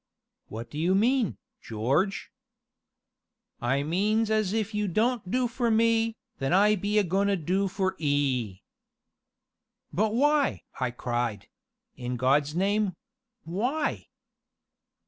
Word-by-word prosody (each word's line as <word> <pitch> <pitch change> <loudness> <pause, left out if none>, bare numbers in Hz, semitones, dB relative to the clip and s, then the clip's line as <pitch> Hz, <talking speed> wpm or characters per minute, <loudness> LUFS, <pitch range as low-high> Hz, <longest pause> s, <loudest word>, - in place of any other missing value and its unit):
"What 115 +2 -8
do 150 - -5
you 180 +4 +2
mean, 235 +2 +2 0.2
George?" 135 - -1 1.3
"I 135 +4 +1
means 210 +7 +1
as 215 -3 +1
if 220 0 -1
you 210 0 0
don't 220 +2 0
do 250 +4 +1
for 240 0 -1
me, 225 0 +2 0.2
then 135 +4 0
I 205 +3 +5
be 205 +2 -1
a 210 - +5
goin' 195 +3 +1
to 200 - +2
do 185 +5 0
for 190 0 -1
'ee." 135 - 0 1.3
"But 215 +3 +1
why?" 290 +2 +2 0.2
I 130 -1 0
cried; 120 -3 -3 0.5
"in 125 0 -4
God's 140 +4 +2
name 200 +1 +1 0.5
why?" 240 - -2
195 Hz, 125 wpm, -27 LUFS, 145-220 Hz, 1.3 s, I